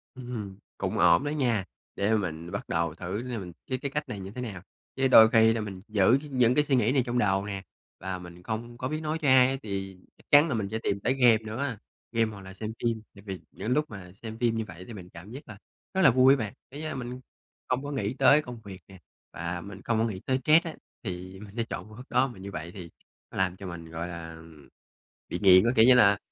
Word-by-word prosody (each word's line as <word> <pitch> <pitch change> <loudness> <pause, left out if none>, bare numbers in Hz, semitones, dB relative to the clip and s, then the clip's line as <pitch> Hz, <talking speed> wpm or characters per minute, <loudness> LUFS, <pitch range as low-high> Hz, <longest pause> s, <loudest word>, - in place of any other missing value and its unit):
Ừm 130 -1 -9
hừm, 100 -5 -5 0.2
cũng - - -2
ổn 85 +4 +5
đó 145 - -1
nha. 120 -10 0 0.3
Để 105 +3 +2
mình 85 -4 -3
bắt - - -5
đầu 85 -1 0
thử, 95 +5 -4
để 125 -2 -4
mình 90 -3 -6 0.2
cái 130 - 0
cái 140 +1 -4
cách 150 +1 -3
này 105 - -5
như 95 +1 -7
thế 125 - -6
nào. 105 -7 -6 0.3
Chứ 135 0 +2
đôi 110 -4 +9
khi 115 0 +5
thì 115 - -2
mình 95 -3 -6
giữ 110 +4 +4
những 125 -1 +3
cái 150 - +4
suy 140 -2 +1
nghĩ 120 -1 +3
này 135 -2 +3
trong 120 0 -1
đầu 95 -3 +2
nè, 100 -2 -4 0.4
và 95 0 -4
mình 90 0 -12
không 115 +3 -5
có 130 +1 -3
biết 155 +2 -3
nói 155 +1 -2
cho 150 - 0
ai, 130 0 +5
thì 95 -2 -5 0.2
chắc - - -22
chắn 145 +2 +8
là 140 - 0
mình 105 -3 -1
sẽ 110 - -2
tìm 100 - 0
tới 125 - +1
game 125 -4 +5
nữa 110 0 -7
á, 135 -4 -2 0.3
game 115 -1 +1
hoặc 100 - -10
là 95 0 -10
xem 110 +3 -5
phim. 115 -2 0
Tại 100 - -13
vì 95 -2 -5
những 110 - -4
lúc 150 +1 0
mà 95 -4 -9
xem 110 +2 -8
phim 115 -2 +1
như 110 - -2
vậy 85 +2 -10
thì 120 - -8
mình 90 -4 -10
cảm 90 +6 -12
giác 135 +4 -9
là 105 -3 -10 0.4
rất 190 - +1
là - - +7
vui 130 +2 +6
á 140 - +2
bạn, 110 -2 -4 0.2
cái, 145 +3 -7
a, 155 - -4
mình 125 0 -5 0.5
không 125 +2 -1
có 145 - -5
nghĩ 110 -6 -2
tới 145 +2 +5
công 120 -5 -9
việc 95 -3 -9
nè, 95 - -13 0.4
và 85 +1 -4
mình 95 0 -10
không 115 - +1
có 115 - +3
nghĩ 105 -5 -3
tới 130 -1 +1
stress 160 +4 +5
á, 160 - -4 0.3
thì 95 -1 -6
mình 100 -1 -11
sẽ 115 - +1
chọn - - -6
phương 110 - -13
thức 125 - -10
đó. 130 +2 +3
Mà 120 -7 -11
như 100 +1 -7
vậy 80 +1 -6
thì 90 -3 -9 0.4
nó - - -9
làm 95 -1 +1
cho 95 - -8
mình, 85 -2 -8
gọi 85 +1 -4
là, 85 -2 -7
ừm, 80 -3 -15 0.6
bị 90 - -3
nghiện 95 -2 +7
á, 120 - +4
kiểu 110 - +7
như 130 - +8
là, 100 -4 +6
110 Hz, 270 wpm, -28 LUFS, 95-125 Hz, 0.6 s, đôi